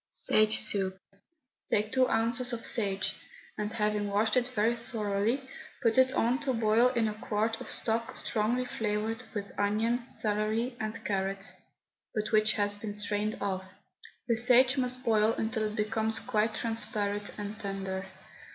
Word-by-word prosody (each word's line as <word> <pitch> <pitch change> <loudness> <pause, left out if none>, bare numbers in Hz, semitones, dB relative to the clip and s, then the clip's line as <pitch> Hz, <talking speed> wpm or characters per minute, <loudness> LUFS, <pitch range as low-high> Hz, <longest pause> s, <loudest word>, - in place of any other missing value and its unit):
SAGO 215 0 +3
SOUP. 195 -3 +4 0.7
Take 210 +1 +1
two 260 -1 +3
ounces 235 +2 +1
of 230 - -4
sage, 200 -5 +2 0.4
and 210 0 -3
having 210 -2 0
washed 205 +2 +1
it 250 -1 +2
very 230 -1 +1
thoroughly, 230 +2 -1 0.4
put 230 +1 +4
it 260 0 +5
on 245 +2 +2
to 280 -3 -1
boil 225 +1 +4
in 230 -3 +2
a 215 - -2
quart 220 +2 -2
of - - -8
stock 230 0 -1
strongly 235 +4 0
flavoured 220 0 -2
with 200 -1 -4
onion, 225 +4 0
celery, 220 +2 -1
and 215 +1 -4
carrot, 195 0 -1 0.6
but 215 -1 -1
which 215 -1 +4
has 205 -1 0
been 205 0 -6
strained 210 +1 -2
off. 190 -2 -2 0.6
The 230 -2 +2
sage 250 +2 +5
must 255 -1 -2
boil 220 -2 +3
until 220 -1 -1
it 210 0 -3
becomes 220 +1 0
quite 215 0 0
transparent 210 -3 -3
and 205 +1 -6
tender. 195 -2 -4
220 Hz, 150 wpm, -30 LUFS, 210-230 Hz, 0.7 s, it